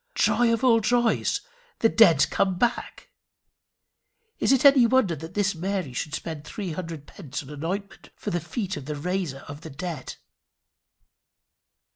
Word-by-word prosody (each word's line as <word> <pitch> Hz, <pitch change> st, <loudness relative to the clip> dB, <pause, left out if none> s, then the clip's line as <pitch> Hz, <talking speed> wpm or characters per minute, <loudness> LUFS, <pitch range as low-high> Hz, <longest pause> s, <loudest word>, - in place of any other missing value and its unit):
Joy 240 Hz, -1 st, +3 dB
of 230 Hz, +2 st, 0 dB
all 235 Hz, -3 st, +5 dB
joys! 240 Hz, +1 st, +1 dB, 0.4 s
The 225 Hz, -, +4 dB
dead 170 Hz, -11 st, +5 dB
come 190 Hz, -2 st, +1 dB
back! 240 Hz, -, -2 dB, 1.3 s
Is -, -, +2 dB
it 270 Hz, 0 st, +3 dB
any 275 Hz, -4 st, +7 dB
wonder 230 Hz, -9 st, +2 dB
that 160 Hz, +4 st, -10 dB
this 205 Hz, -1 st, +1 dB
Mary 180 Hz, -4 st, -3 dB
should 150 Hz, +5 st, -3 dB
spend 160 Hz, -3 st, -6 dB
three 185 Hz, +4 st, -5 dB
hundred 165 Hz, -3 st, -6 dB
pence 150 Hz, -6 st, -7 dB
on 140 Hz, -, -12 dB
an 145 Hz, +1 st, -8 dB
ointment 200 Hz, +4 st, -5 dB
for 205 Hz, -, -5 dB
the 175 Hz, -, 0 dB
feet 195 Hz, -, -4 dB
of 130 Hz, -, -8 dB
the 150 Hz, +1 st, -4 dB
Raiser 165 Hz, -3 st, -3 dB
of 145 Hz, +1 st, -9 dB
the 160 Hz, -, -9 dB
Dead? 160 Hz, -1 st, -6 dB
185 Hz, 160 wpm, -25 LUFS, 155-225 Hz, 1.3 s, any